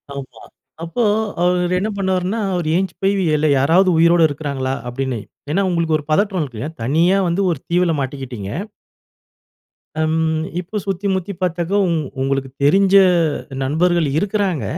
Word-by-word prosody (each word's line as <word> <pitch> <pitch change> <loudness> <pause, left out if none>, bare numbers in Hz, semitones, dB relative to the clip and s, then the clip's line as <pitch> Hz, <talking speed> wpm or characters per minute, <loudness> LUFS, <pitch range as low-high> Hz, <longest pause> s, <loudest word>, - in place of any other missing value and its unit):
.ஆமா. 140 -2 -9 0.4
அப்போ 170 +9 -2 0.4
அவரு 180 0 +1
என்ன 210 +3 -1
பண்ணுவாருன்னா, 190 +2 -1
"அவரு 170 -3 -1
எழுந்ச்சு 185 -1 -1
போய, 195 +1 +3 0.2
இல்ல 155 +1 +1
யாராவது 170 +8 +4
உயிரோட 170 +1 +5
இருக்றாங்களா" 140 -3 -3 0.2
அப்படின்னு. 130 -1 -3 0.3
ஏன்னா 190 +6 +2
உங்களுக்கு 165 -3 +1
ஒரு - - -9
பதற்றம் 195 +2 +1
இருக்கும் 125 -7 -5
இல்லையா? 155 +5 -6
தனியா 165 +10 +3
வந்து 175 +3 0
ஒரு 160 - -3
தீவுல 175 -1 +2
மாட்டிக்கிட்டீங்க. 130 -7 -5 1.5
அம், 160 0 +1 0.4
இப்போ 185 +4 -8
சுத்தி 195 0 -2
முத்தி 190 +1 -3
பார்த்ததும், 180 +1 0 0.3
"உங்களுக்கு 135 0 -1
தெரிஞ்ச 195 +6 +4 0.7
நண்பர்கள் 165 +3 +1
இருக்குறாங்க, 195 -3 -1
170 Hz, 135 wpm, -19 LUFS, 145-185 Hz, 1.5 s, உயிரோட